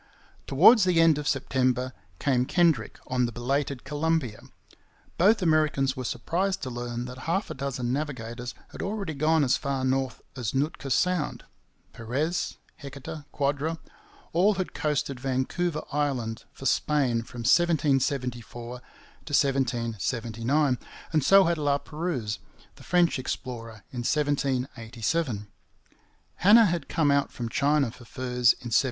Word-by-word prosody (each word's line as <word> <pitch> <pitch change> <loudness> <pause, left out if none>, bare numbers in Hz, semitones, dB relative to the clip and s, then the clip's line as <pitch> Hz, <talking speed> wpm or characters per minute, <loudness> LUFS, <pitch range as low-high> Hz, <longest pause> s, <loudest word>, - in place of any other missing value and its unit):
Towards 195 - +7
the 180 -2 +3
end 165 -3 +5
of 145 - -4
September 130 -1 0 0.2
came 125 0 +1
Kendrick 160 - +2
on 125 -1 +1
the - - -5
belated 135 +2 -2
Columbia. 150 -5 -1 0.8
Both 200 +3 +4
Americans 155 -5 +2
were 130 - -4
surprised 180 +11 -1
to 130 - -4
learn 120 0 -4
that 125 +1 -8
half 190 +5 0
a - - -2
dozen 130 -3 -3
navigators 125 -4 -4
had - - -8
already 195 -4 -3
gone 155 +2 +2
as 130 - +3
far 135 -2 -2
north 130 0 -1
as 125 -2 -3
Nootka 140 0 -1
Sound. 180 +3 0 0.5
Perez, 140 +10 -2 0.2
Heceta, 140 +2 -8
Quadra 145 +3 -1 0.6
all 195 +5 +4
had 185 -1 -3
coasted 140 -3 -1
Vancouver 135 +6 -1
Island 135 -6 -2
for 135 - -11
Spain 135 -3 +2
from 120 +1 -9
1774 130 -5 +1
to - - -25 0.5
1779, 120 0 +1 0.3
and 155 -3 +3
so 195 +5 +7
had 170 -2 +1
La 145 -1 +2
Pérouse, 145 -9 -3 0.4
the - - -14
French 175 -5 +2
explorer, 115 -4 -6
in 125 - -5
1787. 130 -3 -1 0.9
Hanna 220 +5 +7
had 170 -5 -1
come 150 -3 +2
out 140 0 +2
from 120 -2 -5
China 140 -1 +2
for 120 - -14
furs 125 -1 +2
in 120 -2 -7
1785. - - +7
135 Hz, 135 wpm, -27 LUFS, 125-155 Hz, 0.9 s, Towards